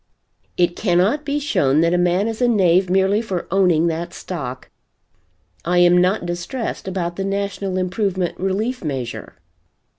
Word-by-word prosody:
"It 175 -1 +2
cannot 200 +9 +1
be 285 0 -1
shown 155 - +2
that 170 +1 +2
a - - +3
man 180 +4 +2
is 225 +1 -4
a 245 - +4
knave 185 -5 +3
merely 190 +3 +2
for 190 -6 -4
owning 180 -4 +3
that 170 +1 -3
stock. 130 -8 -6 0.9
I 175 +2 0
am 175 0 +6
not 185 +1 +1
distressed 175 +7 -4
about 175 -2 -3
the 195 - -2
National 195 -1 -2
Improvement 185 -1 -1
Relief 205 +7 -2
Measure." 130 -6 -5
185 Hz, 150 wpm, -20 LUFS, 175-200 Hz, 0.9 s, am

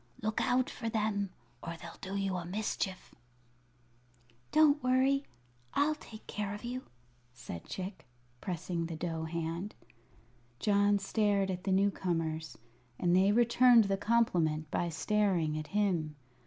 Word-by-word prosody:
"Look 215 0 0
out 255 0 +2
for 230 -2 -4
them, 210 -3 0 0.3
or 170 0 -6
they'll - - -10
do 195 +1 -5
you 195 -1 -1
a 180 - -3
mischief." 190 0 -3 1.4
"Don't 300 -1 +5
worry; 265 +2 +3 0.5
I'll 300 +2 +3
take 225 -7 -12
care 205 -1 -3
of 210 - -10
you," 250 +2 -4 0.5
said 105 -9 -8
Chick, 185 -5 -6 0.3
pressing 170 -2 -3
the 165 - -5
dough 160 0 -3
hand. 170 +4 -4 0.8
John 205 - +3
stared 200 -1 +1
at 180 0 -5
the 195 - +1
new 200 +2 +4
comers, 160 -4 -2 0.4
and 175 0 +2
they 190 +2 +5
returned 240 +1 +6
the 195 -1 +1
compliment 175 -8 +1
by 175 - 0
staring 175 -2 +1
at 155 -1 -4
him. 180 -7 0
195 Hz, 140 wpm, -32 LUFS, 170-220 Hz, 1.4 s, returned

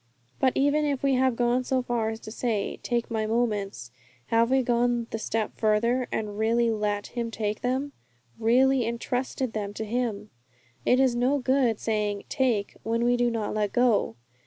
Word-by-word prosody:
But 260 -1 +3
even 285 +2 +2
if 280 -3 -1
we 275 -1 +3
have 260 -1 +2
gone 245 +1 +1
so 255 0 0
far 235 -3 -1
as 220 0 -5
to 215 - -9
say, 225 -3 -2
'Take 240 -1 -2
my 220 -1 -1
moments,' 210 - -1 0.4
have 230 +1 +3
we 265 0 +3
gone 240 0 +1
the 225 - -3
step 220 0 -2
farther, 235 +4 +2
and 210 -1 -3
really 230 +1 +2
let 210 -1 -1
Him 235 -1 -2
take 215 -1 -3
them 260 +3 -1 0.5
really 255 +3 +4
entrusted 245 +1 -2
them 205 -1 -4
to 220 - -4
Him? 215 -2 -2 0.6
It 250 - +5
is 260 -3 +3
no 255 +4 +2
good 260 -4 +1
saying 210 -2 -1
'take,' 235 -6 0
when 230 +1 -1
we 245 0 +3
do 245 0 +2
not 225 -3 -2
let 210 -2 -1
go. 240 - +2
235 Hz, 180 wpm, -26 LUFS, 215-250 Hz, 0.6 s, It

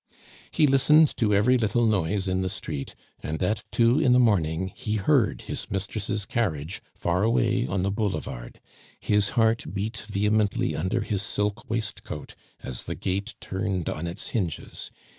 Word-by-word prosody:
He 155 - +3
listened 150 +3 +5
to 110 -3 +2
every 115 +6 +4
little 115 +1 +2
noise 100 -2 +1
in 95 0 0
the 95 - -1
street, 70 -5 -5 0.3
and 80 +4 -3
at 105 +3 0
two 120 +4 +4
in 135 -6 +4
the 125 - +6
morning 95 -6 +2
he 105 - -2
heard 115 +2 +2
his - - -5
mistress' 100 +1 -2
carriage 90 -8 -2
far 85 +1 0
away 110 - +2
on 95 +3 -1
the 100 - +1
boulevard. 100 - -3 0.4
His 105 -1 +2
heart 115 0 +2
beat 105 +4 -2
vehemently 105 0 +1
under 95 +9 0
his 100 -3 -1
silk 105 0 -2
waistcoat 110 -9 -4 0.3
as 60 - -4
the - - -4
gate 95 +1 -2
turned 95 -2 -2
on 80 +3 -3
its 85 +5 -4
hinges. 90 -9 -3
100 Hz, 160 wpm, -26 LUFS, 95-115 Hz, 0.4 s, the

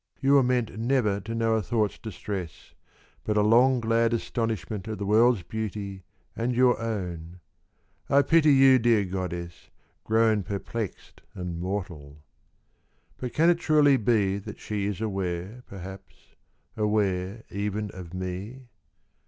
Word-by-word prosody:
You 135 +1 +3
were 140 - +7
meant 125 -3 0
Never 115 -4 +1
to 115 +3 -6
know 115 0 +1
a 110 - +2
thought's 105 +1 -1
distress, 100 -6 -7 0.5
But 105 0 -1
a 105 - +4
long 125 +4 +5
glad 115 0 +2
astonishment 110 -4 -3
At 110 -1 -4
the 100 - -4
world's 110 0 +4
beauty 100 -1 -5 0.3
and 120 +2 -1
your 125 -1 +3
own. 90 -6 -5 0.7
I 140 +1 +5
pity 160 -1 +4
you, 135 -1 +6
dear 115 -3 +3
goddess, 90 -2 -5 0.3
grown 110 -1 +3
Perplexed 100 +2 -6
and 90 -2 -5
mortal.' 85 -6 -5 1.0
But 125 -2 -5
can 165 +3 +4
it 170 - 0
truly 150 -4 +4
be 100 -4 +1
That 105 +1 -9
she 105 -2 -3
is 105 0 -4
aware, 95 +1 -3
perhaps, 95 0 -11 0.5
aware 105 -1 0
even 105 0 -3
of 90 -3 -10
me 95 +8 -6
105 Hz, 135 wpm, -26 LUFS, 95-115 Hz, 1.0 s, were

